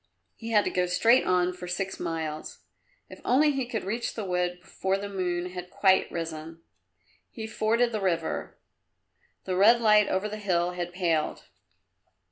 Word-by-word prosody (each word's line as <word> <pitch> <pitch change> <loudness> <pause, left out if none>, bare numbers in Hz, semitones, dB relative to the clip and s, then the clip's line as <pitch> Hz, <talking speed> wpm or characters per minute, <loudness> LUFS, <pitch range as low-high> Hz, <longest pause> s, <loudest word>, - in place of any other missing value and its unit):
He 225 - -8
had 210 -2 +4
to - - -1
go 180 0 +1
straight 230 +8 +4
on 180 0 +2
for 180 0 -8
six 195 +2 -3
miles. 160 -2 -5 0.4
If - - -13
only 295 +4 +4
he 270 -3 -2
could 230 -3 -3
reach 230 +5 -3
the 215 - -4
wood 180 -1 -1
before 190 +2 -2
the 200 +1 -5
moon 180 -2 -2
had 180 0 -7
quite 190 0 +3
risen! 165 0 -6 0.7
He 220 - -7
forded 225 +2 +1
the 215 -2 -2
river. 180 -4 -2 0.9
The 185 - -2
red 220 +6 +6
light 210 -2 +5
over 190 +3 0
the 215 0 -6
hill 180 -4 0
had 175 -1 -4
paled. 170 -4 -1
185 Hz, 165 wpm, -27 LUFS, 175-215 Hz, 0.9 s, red